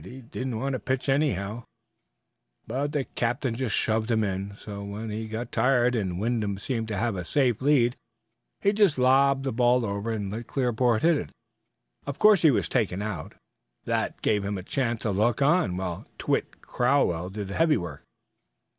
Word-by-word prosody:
He 125 +9 -10
didn't 125 0 -4
want 135 +3 -1
to 130 - -2
pitch 130 +5 -2
anyhow, 120 -6 0 1.0
but 140 +5 -2
the 145 -3 0
captain 125 +1 -2
just 115 -4 -1
shoved 110 +1 0
him 110 -2 +2
in; 100 0 -3
so 100 -1 -8
when 105 +2 -5
he 110 +1 -4
got 110 +2 -5
tired 125 +1 +3
and 95 -6 -2
Wyndham 105 -3 -1
seemed 115 +2 -3
to 105 -2 -3
have 115 0 0
a 90 - -3
safe 125 +2 +1
lead, 130 -3 +3 0.7
he 200 0 +3
just 200 -8 +3
lobbed 135 +1 +4
the 135 - -1
ball 120 0 +3
over 100 +2 -3
and 105 -3 -3
let 115 +3 -6
Clearport 120 -3 +1
hit. 165 -2 +2 0.8
Of 140 - -4
course 210 -3 +6
he 160 - +6
was - - +1
taken 105 -5 0
out, 100 -9 -5
and - - -31 0.5
that - - -2
gave 105 -2 +2
him 100 0 -2
a 95 - -6
chance 120 0 -2
to 105 - 0
look 110 +4 +1
on 140 - +2
while 90 -3 -4
Twitt - - -2
Crowell 120 -10 +1
did 100 0 -6
the - - -5
heavy 160 +2 +3
work." 85 -5 -6
115 Hz, 185 wpm, -26 LUFS, 100-135 Hz, 1.0 s, course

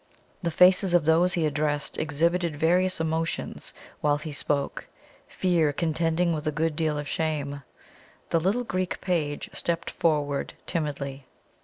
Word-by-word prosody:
The 170 - 0
faces 180 +2 +5
of 170 -4 +3
those 170 +3 +4
he 165 -2 +1
addressed 150 0 -1
exhibited 165 +2 +1
various 180 +4 +2
emotions 160 0 -2 0.3
while 145 -1 +2
he 155 +1 -6
spoke 140 0 -2 0.4
fear 170 -5 +1
contending 165 +2 +1
with 155 0 -3
a - - +2
good 155 +1 -1
deal 155 -1 0
of 145 0 -4
shame. 145 -3 -2 0.7
The 165 - +4
little 200 +9 +1
Greek 185 -5 -2
page 155 -6 -2
stepped 170 -1 -2
forward 145 -4 0
timidly. 140 -5 -3
160 Hz, 140 wpm, -26 LUFS, 150-175 Hz, 0.7 s, faces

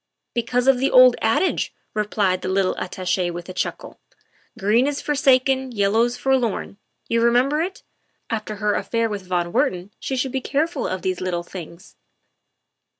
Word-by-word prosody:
" - - -58
Because 245 +1 0
of 270 -2 +5
the 270 - +2
old 255 -1 +7
adage," 225 +12 +1 0.2
replied 205 -3 0
the 185 - -3
little 190 0 +1
Attache 185 -1 -1
with 175 0 -7
a - - -6
chuckle, - - -4 0.2
" - - -38
' 245 - -23
green 220 +6 +3
is 290 -1 -2
forsaken, 265 -2 +2
yellow's 225 +3 +1
forlorn' 245 -6 0 0.3
you 230 0 +1
remember 250 +6 +3
it? 375 +4 -4 0.4
After 215 -2 -4
her 210 0 0
affair 230 -1 -1
with 200 -3 -6
von 175 -1 -1
Wertman 180 +2 0
she 265 - -3
should 260 +1 -1
be 265 0 -2
careful 310 +6 -1
about 185 0 -4
those 185 -1 -2
little 175 -2 -2
things." 175 +1 -11
225 Hz, 170 wpm, -22 LUFS, 185-260 Hz, 0.4 s, old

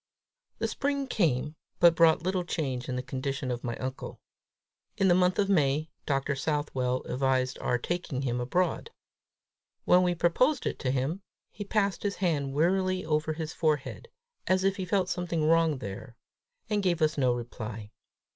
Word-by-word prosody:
The - - -1
spring 280 -1 -1
came, 150 - 0 0.2
but 170 -1 +7
brought 165 -1 +4
little 185 0 0
change 135 -8 -3
in 125 - -2
the 125 - -3
condition 135 0 -3
of 120 -1 -4
my 120 -1 -3
uncle. 130 0 -6 0.8
In 195 - +3
the - - +6
month 180 0 +3
of 200 - +2
May, 155 -4 +1 0.2
Dr. 140 0 0
Southwell 135 -3 -1
advised 130 0 0
our 125 - 0
taking 145 -1 -3
him 125 -2 -1
abroad. 175 - 0 1.0
When 180 - +6
we 180 -1 +1
proposed 250 - +2
it - - -2
to 130 - -1
him, 135 +8 -1 0.3
he 205 - -6
passed 200 -2 0
his 205 -1 -1
hand 145 -7 -1
wearily 185 +4 +1
over 155 0 0
his 160 0 -5
forehead, 155 -4 -1 0.4
as 185 0 +2
if 195 0 +1
he 190 - -3
felt 185 0 +1
something 175 -4 -1
wrong 165 -2 +3
there, 115 +2 -8 0.5
and 210 -1 0
gave 175 -4 +1
us 155 0 +2
no 130 -4 +2
reply. 110 -3 -7
155 Hz, 165 wpm, -28 LUFS, 130-180 Hz, 1.0 s, but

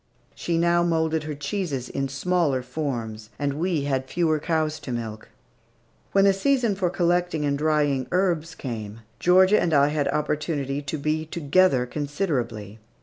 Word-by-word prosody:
She 170 -1 -2
now 170 +1 +3
moulded 160 -2 0
her 150 -1 -4
cheeses 145 -4 -3
in 135 0 -3
smaller 140 -2 0
forms, 120 -6 -4
and 145 -1 -1
we 165 0 -1
had 130 -2 -1
fewer 160 -3 +1
cows 155 -1 -1
to 130 - -7
milk. 110 -2 -5 0.8
When 195 0 +4
the 195 - +5
season 240 +2 +1
for 185 -2 0
collecting 175 -3 0
and 140 -1 +1
drying 145 -3 +1
herbs 170 -3 0
came, 110 -4 -6 0.2
Georgia 185 - +5
and 165 -3 +1
I 140 0 +5
had 150 -1 0
opportunity 145 -2 -1
to 145 +2 -4
be 155 +2 -1
together 160 -4 +2
considerably. 130 - -3
150 Hz, 150 wpm, -24 LUFS, 135-175 Hz, 0.8 s, the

